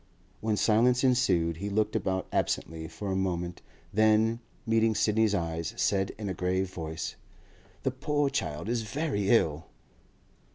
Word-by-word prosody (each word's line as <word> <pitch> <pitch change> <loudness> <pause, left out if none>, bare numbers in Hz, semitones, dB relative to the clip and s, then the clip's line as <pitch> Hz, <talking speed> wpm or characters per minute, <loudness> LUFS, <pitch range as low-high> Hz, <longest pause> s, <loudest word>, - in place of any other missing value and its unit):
When 110 -1 0
silence 120 +5 +3
ensued, 90 -11 +2
he 100 +4 -4
looked 105 +1 0
about 95 0 0
absently 80 0 -1
for 100 +4 -5
a - - 0
moment; 90 -2 -2 0.3
then, 110 +2 +3 0.3
meeting 115 -1 +3
Sidney's 105 0 +2
eyes, 85 -3 -2
said 95 -1 +1
in 105 -2 -5
a 95 - -1
grave 95 +1 -1
voice: 80 -1 -5 0.7
'That 130 -1 -2
poor 145 -2 +1
child 75 +6 -2
is 120 0 0
very 110 -4 -1
ill. 80 -9 +2
105 Hz, 140 wpm, -29 LUFS, 90-115 Hz, 0.7 s, silence